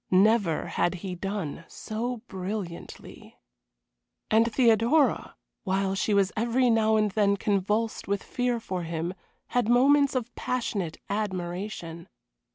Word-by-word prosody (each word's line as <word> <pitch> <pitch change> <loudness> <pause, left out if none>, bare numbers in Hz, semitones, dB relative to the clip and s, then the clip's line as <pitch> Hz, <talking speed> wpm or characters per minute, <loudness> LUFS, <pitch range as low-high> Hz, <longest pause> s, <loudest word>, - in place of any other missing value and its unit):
Never 195 -3 +3
had 175 - 0
he 185 - -3
done 180 -4 -4
so 235 +2 -5
brilliantly. 185 -2 -7 0.9
And 225 +2 +4
Theodora, 235 +5 +3 0.3
while 195 0 0
she 200 +2 0
was 195 -1 +3
every 240 +2 +2
now 220 -1 +3
and 215 -1 +2
then 200 -1 +2
convulsed 210 +3 -1
with 200 0 -1
fear 245 -1 -1
for 185 -5 -4
him, 165 +1 -3 0.4
had 245 -3 +1
moments 275 +3 +4
of 240 -2 -2
passionate 205 -9 -2
admiration. 185 -3 -4
210 Hz, 120 wpm, -27 LUFS, 185-230 Hz, 0.9 s, And